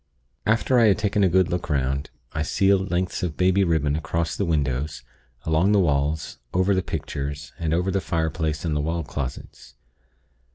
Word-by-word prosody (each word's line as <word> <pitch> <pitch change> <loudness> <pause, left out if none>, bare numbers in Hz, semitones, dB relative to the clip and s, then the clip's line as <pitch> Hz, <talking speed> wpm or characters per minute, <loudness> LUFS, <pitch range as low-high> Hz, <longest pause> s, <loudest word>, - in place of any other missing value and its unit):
"After 115 +3 +3
I 115 - +6
had 100 - +4
taken 105 0 +1
a 95 - +4
good 95 0 +3
look 90 0 -3
'round, 70 0 0 0.2
I 80 - -2
sealed 95 +4 +2
lengths 90 +1 -1
of 85 -4 -3
baby 95 +2 +3
ribbon 80 -5 +1
across 80 +1 -2
the 100 - -1
windows, 75 -3 -1 0.4
along 80 +6 +3
the 105 - +5
walls, 75 -2 0 0.2
over 95 +2 +3
the 95 - +2
pictures, 70 -4 -5
and 80 -2 -1
over 90 +3 +1
the 95 0 0
fireplace 80 -1 -1
and 80 -2 0
the 75 - +1
wall 80 +2 -1
closets. 70 -3 -7
80 Hz, 175 wpm, -24 LUFS, 75-95 Hz, 0.4 s, I